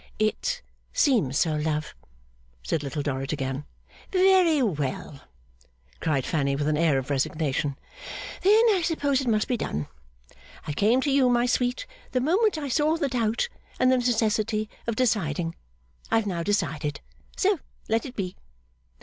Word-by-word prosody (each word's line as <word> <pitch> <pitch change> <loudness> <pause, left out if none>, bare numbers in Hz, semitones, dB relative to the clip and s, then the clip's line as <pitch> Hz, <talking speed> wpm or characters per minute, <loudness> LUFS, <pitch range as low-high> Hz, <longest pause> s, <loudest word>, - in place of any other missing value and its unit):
'It - - -1 0.3
seems 245 - +2
so, 160 -2 +2
love,' 150 0 -2 0.7
said 145 - -1
Little 145 +1 -3
Dorrit 135 -1 -2
again. 135 -1 -3 0.5
'Very 370 -4 +5
well,' 145 - -3 0.8
cried 140 -5 0
Fanny 140 -3 0
with 145 +1 -1
an 155 - +2
air 155 -3 +3
of 130 +2 -3
resignation, 140 0 -1 0.6
'then 425 +4 +6
I 380 -3 +2
suppose 285 -5 +1
it 265 - -4
must 215 -2 +2
be 250 - 0
done! 75 - -3 0.8
I 150 - -3
came 220 - +3
to 280 - 0
you, 270 -2 +4
my 240 0 +3
sweet, 250 - 0 0.3
the 255 - +3
moment 365 - +2
I 295 -2 -3
saw 300 +4 +2
the 290 -4 0
doubt, 235 - 0 0.3
and 255 - +4
the 260 - +4
necessity 220 -2 +1 0.2
of 230 - 0
deciding. 175 - 0 0.6
I - - +2
have 225 -1 +2
now 180 -4 -2
decided. 155 -6 -1 0.4
So 390 -3 +2 0.3
let 225 +1 +1
it 255 - -10
be. 185 -3 -3
215 Hz, 155 wpm, -26 LUFS, -, 0.8 s, then